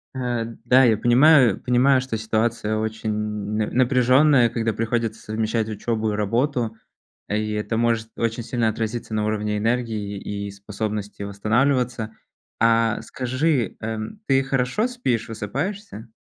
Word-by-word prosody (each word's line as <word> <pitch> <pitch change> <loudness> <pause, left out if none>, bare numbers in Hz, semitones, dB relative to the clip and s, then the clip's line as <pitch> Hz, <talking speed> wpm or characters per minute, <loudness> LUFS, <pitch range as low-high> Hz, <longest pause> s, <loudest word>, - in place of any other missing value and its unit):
Э, 120 -3 -2 0.2
да, 130 +1 +6
я 110 -3 +4
понимаю 125 -1 +5
понимаю, 130 +2 +3
что 125 -3 -3
ситуация 110 0 -1
очень 110 0 -3
на 105 0 -2
напряженная, 130 +1 +4
когда 115 -1 -1
приходится 115 0 -2
совмещать 110 +1 -2
учебу 110 0 -2
и - - -2
работу, 115 +2 0 0.5
и 105 +1 -1
это 105 +1 -2
может 115 -1 +1
очень 115 0 -1
сильно 115 -2 0
отразиться 110 +1 -4
на 105 0 0
уровне 105 -1 -1
энергии, 110 -3 -1
и 100 0 -5
способности 105 0 -5
восстанавливаться. 115 +2 0 0.5
А, 115 -1 +3
скажи, 130 - -1
эм, 110 - -5
ты 135 -1 +3
хорошо 135 - 0
спишь, 125 - -2
высыпаешься? 120 - -5
115 Hz, 130 wpm, -23 LUFS, 110-125 Hz, 0.5 s, да